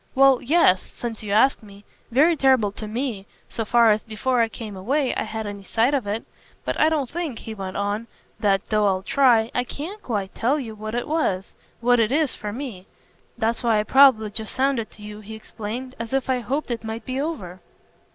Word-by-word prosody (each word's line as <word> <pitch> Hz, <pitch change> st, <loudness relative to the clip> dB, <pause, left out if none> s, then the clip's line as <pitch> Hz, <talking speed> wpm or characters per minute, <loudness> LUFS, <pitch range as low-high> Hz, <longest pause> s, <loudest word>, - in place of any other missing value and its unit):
"Well, 270 Hz, -1 st, +6 dB
yes 265 Hz, -, +4 dB
since 230 Hz, -2 st, -7 dB
you 210 Hz, -2 st, -5 dB
ask 230 Hz, +6 st, +4 dB
me: 200 Hz, -1 st, -15 dB, 0.2 s
very 300 Hz, +8 st, +4 dB
terrible 260 Hz, -8 st, +3 dB
to 215 Hz, +1 st, -7 dB
ME 220 Hz, -3 st, -3 dB, 0.2 s
so 225 Hz, -, -4 dB
far 230 Hz, +1 st, +5 dB
as, 210 Hz, 0 st, +2 dB
before 240 Hz, +3 st, 0 dB
I 225 Hz, -, +2 dB
came 220 Hz, -2 st, -7 dB
away, 260 Hz, +9 st, 0 dB
I -, -, -2 dB
had 220 Hz, 0 st, -4 dB
any 205 Hz, -1 st, -6 dB
sight 225 Hz, +7 st, +1 dB
of 260 Hz, -7 st, 0 dB
it. 210 Hz, +3 st, -2 dB, 0.4 s
But -, -, -2 dB
I 310 Hz, -, +5 dB
don't 300 Hz, -5 st, 0 dB
think," 315 Hz, -4 st, -4 dB
he 225 Hz, -, -7 dB
went 190 Hz, -3 st, -6 dB
on, 205 Hz, +3 st, -2 dB, 0.3 s
"that 195 Hz, -2 st, +2 dB
though 210 Hz, -1 st, +2 dB
I'll 190 Hz, -1 st, 0 dB
try 240 Hz, -3 st, +3 dB
I 245 Hz, -, +1 dB
CAN 325 Hz, -, -7 dB
quite 205 Hz, -5 st, -3 dB
tell 270 Hz, +6 st, +1 dB
you 230 Hz, -5 st, -6 dB
what 215 Hz, +1 st, -6 dB
it 240 Hz, -, -2 dB
was, 295 Hz, -, -1 dB, 0.3 s
what 245 Hz, 0 st, +4 dB
it 225 Hz, 0 st, +2 dB
is, 295 Hz, -2 st, +2 dB
for 210 Hz, -, -5 dB
me. 225 Hz, -6 st, -7 dB, 0.5 s
That's 230 Hz, 0 st, 0 dB
why 230 Hz, -3 st, +3 dB
I -, -, +1 dB
probably 240 Hz, -3 st, +5 dB
just 220 Hz, 0 st, -5 dB
sounded 260 Hz, -4 st, +1 dB
to 210 Hz, -, -15 dB
you," 210 Hz, 0 st, -8 dB
he 215 Hz, +1 st, -9 dB
explained, 225 Hz, +4 st, -6 dB
"as 230 Hz, +2 st, -5 dB
if 270 Hz, -1 st, +1 dB
I 255 Hz, -, +1 dB
hoped 260 Hz, +4 st, -2 dB
it 235 Hz, -1 st, -3 dB
might 220 Hz, 0 st, -5 dB
be 260 Hz, +1 st, -2 dB
over." 195 Hz, -, -5 dB
230 Hz, 215 wpm, -23 LUFS, 210-265 Hz, 0.5 s, Well